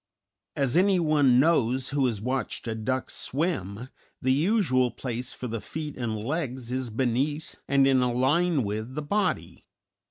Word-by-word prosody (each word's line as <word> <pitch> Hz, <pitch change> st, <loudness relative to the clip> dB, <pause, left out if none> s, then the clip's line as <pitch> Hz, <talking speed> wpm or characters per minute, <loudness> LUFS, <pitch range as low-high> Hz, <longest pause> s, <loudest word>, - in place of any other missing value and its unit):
As 135 Hz, -1 st, 0 dB
anyone 155 Hz, -9 st, +4 dB
knows 130 Hz, -4 st, +2 dB
who 140 Hz, -2 st, +1 dB
has 110 Hz, -4 st, -3 dB
watched 130 Hz, 0 st, -2 dB
a 115 Hz, -, -1 dB
duck 130 Hz, +4 st, -2 dB
swim, 130 Hz, -, -2 dB, 0.3 s
the 130 Hz, 0 st, +2 dB
usual 150 Hz, -, +2 dB
place 125 Hz, 0 st, -5 dB
for 125 Hz, -, -6 dB
the 115 Hz, -2 st, -4 dB
feet 150 Hz, +6 st, -6 dB
and 115 Hz, -3 st, -3 dB
legs 130 Hz, 0 st, -3 dB
is 130 Hz, -1 st, -2 dB
beneath 135 Hz, +7 st, -1 dB
and 140 Hz, 0 st, +4 dB
in 135 Hz, -1 st, +4 dB
a 125 Hz, -1 st, +1 dB
line 145 Hz, +5 st, +2 dB
with 110 Hz, +5 st, -4 dB
the 150 Hz, -, -3 dB
body. 205 Hz, +8 st, -1 dB
130 Hz, 155 wpm, -27 LUFS, 120-150 Hz, 0.3 s, anyone